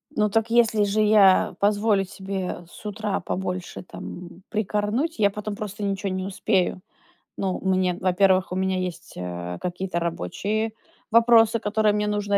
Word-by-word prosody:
Ну, 210 Hz, -1 st, +2 dB
так 225 Hz, +2 st, +1 dB
если 225 Hz, -3 st, +3 dB
же 205 Hz, +2 st, +1 dB
я 210 Hz, -3 st, +5 dB
позволю 205 Hz, 0 st, +2 dB
себе 190 Hz, -2 st, -5 dB
с -, -, -15 dB
утра 210 Hz, -1 st, -2 dB
побольше 185 Hz, 0 st, -4 dB
там, -, -, -10 dB, 0.2 s
м, 175 Hz, +2 st, -15 dB
прикорнуть, 215 Hz, -, -1 dB
я 205 Hz, -2 st, +5 dB
потом 210 Hz, +1 st, -5 dB
просто 210 Hz, -1 st, -6 dB
ничего 200 Hz, 0 st, -1 dB
не 185 Hz, 0 st, -3 dB
успею. 190 Hz, -1 st, 0 dB, 0.6 s
Ну, 190 Hz, -2 st, -1 dB
мне 185 Hz, -2 st, +1 dB
во-первых, 185 Hz, 0 st, +3 dB
у -, -, -2 dB
меня 190 Hz, 0 st, 0 dB
есть, 180 Hz, -2 st, -5 dB
э, 90 Hz, 0 st, -5 dB
какие-то 180 Hz, 0 st, -3 dB
рабочие 200 Hz, -, -2 dB, 0.4 s
вопросы, 230 Hz, 0 st, +5 dB
которые 210 Hz, 0 st, +1 dB
мне 210 Hz, 0 st, 0 dB
нужно 205 Hz, -1 st, +1 dB
200 Hz, 155 wpm, -24 LUFS, 185-215 Hz, 0.6 s, я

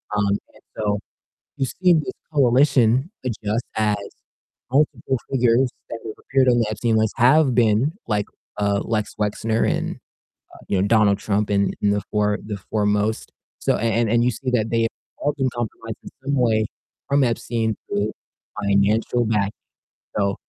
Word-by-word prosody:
um, 100 Hz, -1 st, +2 dB, 0.2 s
and -, -, -20 dB, 0.2 s
so 105 Hz, -1 st, 0 dB, 0.6 s
you 135 Hz, -2 st, 0 dB
see 180 Hz, +6 st, +3 dB
this 160 Hz, +5 st, 0 dB, 0.2 s
coalition 130 Hz, 0 st, +4 dB
adjust 110 Hz, -1 st, -2 dB
as 105 Hz, -1 st, +2 dB, 0.8 s
multiple 135 Hz, -2 st, +1 dB
figures 125 Hz, 0 st, +3 dB, 0.2 s
that 115 Hz, -, -5 dB
have 110 Hz, -, -6 dB
appeared 130 Hz, -1 st, +2 dB
on 120 Hz, -, +4 dB
the 115 Hz, -, +2 dB
Epstein 110 Hz, +1 st, 0 dB
list 110 Hz, -1 st, +1 dB
have 130 Hz, +2 st, +5 dB
been 120 Hz, -, +3 dB
like, 105 Hz, -2 st, 0 dB, 0.3 s
uh, 100 Hz, -1 st, +1 dB
Lex 110 Hz, -2 st, -2 dB
Wexner 110 Hz, +2 st, 0 dB
and, -, -, -2 dB, 0.6 s
uh, -, -, -13 dB
you 95 Hz, -, +1 dB
know, 100 Hz, -, +2 dB
Donald 105 Hz, -3 st, +4 dB
Trump 105 Hz, 0 st, -1 dB
in 100 Hz, -1 st, +2 dB
in 105 Hz, -, +3 dB
the 105 Hz, 0 st, +1 dB
fore 105 Hz, -1 st, +1 dB
the 105 Hz, -1 st, -4 dB
foremost. 105 Hz, +1 st, 0 dB, 0.3 s
So, -, -, +2 dB
and 115 Hz, 0 st, +1 dB
and 120 Hz, 0 st, +3 dB
you 125 Hz, -, +3 dB
see 125 Hz, +3 st, -4 dB
that 110 Hz, -2 st, +1 dB
they 115 Hz, 0 st, +2 dB
have 115 Hz, -, +2 dB, 0.3 s
all 145 Hz, -, 0 dB
been 130 Hz, -2 st, 0 dB
compromised 115 Hz, -2 st, -5 dB
in -, -, -9 dB
some 140 Hz, +1 st, 0 dB
way 110 Hz, -3 st, +2 dB, 0.4 s
from 140 Hz, -1 st, +3 dB
Epstein 115 Hz, -2 st, -1 dB
through 100 Hz, +1 st, -1 dB, 0.5 s
financial 105 Hz, +4 st, +2 dB
backing. 105 Hz, -2 st, +1 dB, 0.7 s
So, 100 Hz, -1 st, +1 dB
115 Hz, 165 wpm, -22 LUFS, 105-125 Hz, 0.8 s, have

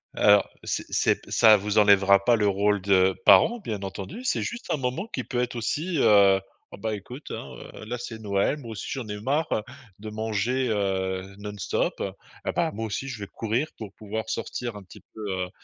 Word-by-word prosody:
alors 105 Hz, -1 st, +5 dB
c'est -, -, -2 dB
c'est -, -, +2 dB
ça 110 Hz, -1 st, +7 dB
vous 105 Hz, +2 st, -2 dB
enlèvera 100 Hz, -1 st, +6 dB
pas 120 Hz, -, +5 dB
le 105 Hz, -2 st, +2 dB
rôle 100 Hz, 0 st, +2 dB
de 95 Hz, -1 st, +4 dB
parents 240 Hz, 0 st, +7 dB
bien 105 Hz, -, -5 dB
entendu. 100 Hz, -, -6 dB
C'est 255 Hz, -, 0 dB
juste 240 Hz, +1 st, -5 dB
un -, -, 0 dB
moment 130 Hz, +9 st, -2 dB
qui -, -, -2 dB
peut 125 Hz, -, -3 dB
être 125 Hz, -, -3 dB
aussi: 155 Hz, +9 st, -2 dB
«Heu, 100 Hz, -3 st, +6 dB, 0.3 s
oh -, -, -9 dB
bah, 110 Hz, 0 st, -2 dB
écoute, 125 Hz, +8 st, -10 dB
hein, -, -, -6 dB, 0.2 s
heu, -, -, -9 dB
là 120 Hz, +2 st, -4 dB
c'est 115 Hz, -2 st, -6 dB
Noël, 100 Hz, +7 st, 0 dB
moi 120 Hz, -6 st, -9 dB
aussi 110 Hz, -, -6 dB
j'en 130 Hz, -5 st, -4 dB
ai 105 Hz, -, -4 dB
eu 105 Hz, -, -7 dB
marre, 145 Hz, +7 st, +1 dB
heu, 110 Hz, -, +1 dB, 0.4 s
de 110 Hz, 0 st, -7 dB
manger, 110 Hz, +4 st, -1 dB
heu, 95 Hz, -2 st, -1 dB
non-stop, 105 Hz, -3 st, -2 dB
heu 95 Hz, -, -2 dB, 0.4 s
et -, -, +2 dB
bah, -, -, +1 dB
moi 110 Hz, +2 st, -4 dB
aussi 135 Hz, +6 st, -4 dB
je 125 Hz, -5 st, -6 dB
vais 100 Hz, -, -6 dB
courir 115 Hz, +9 st, -1 dB
pour 105 Hz, -3 st, -8 dB
pouvoir 110 Hz, +1 st, -5 dB
sortir 120 Hz, -1 st, -4 dB
un 105 Hz, -, -8 dB
petit 90 Hz, -, -15 dB
peu, 110 Hz, -, -10 dB
heu» 90 Hz, -1 st, -2 dB
105 Hz, 215 wpm, -26 LUFS, 100-120 Hz, 0.4 s, ça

